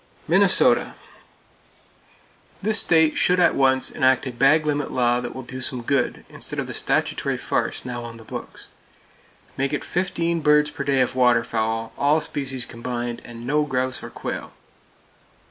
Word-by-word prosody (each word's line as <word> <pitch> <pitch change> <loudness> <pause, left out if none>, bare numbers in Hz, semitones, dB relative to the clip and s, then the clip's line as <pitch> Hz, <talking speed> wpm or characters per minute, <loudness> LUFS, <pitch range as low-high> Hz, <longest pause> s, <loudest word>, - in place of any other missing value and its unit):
Minnesota: - - +3 1.6
This 215 +1 +1
state 160 -2 +3
should 180 0 +3
at 175 - +5
once 130 -1 +2
enact 130 0 +2
a 130 - -3
bag 140 +6 +3
limit 145 -1 -1
law 120 -1 +2
that 120 -1 -6
will 130 - -6
do 130 +2 -7
some 125 -1 -2
good, 140 +2 -1
instead - - -7
of - - -1
the - - -6
statutory - - 0
farce - - -2
now 120 -1 -5
on 115 -1 -8
the 115 - -12
books. - - -9 0.9
Make 135 +2 -1
it 150 - -2
fifteen 170 -2 -1
birds 150 0 +4
per 140 - -5
day 140 -2 +2
of 125 - +1
waterfowl, 115 -2 +1
all 145 +3 +3
species 135 -5 -3
combined, 120 0 -5
and 120 0 -10
no 150 +3 +2
grouse 130 -2 -2
or - - -8
quail. - - -6
130 Hz, 160 wpm, -23 LUFS, 120-150 Hz, 1.6 s, at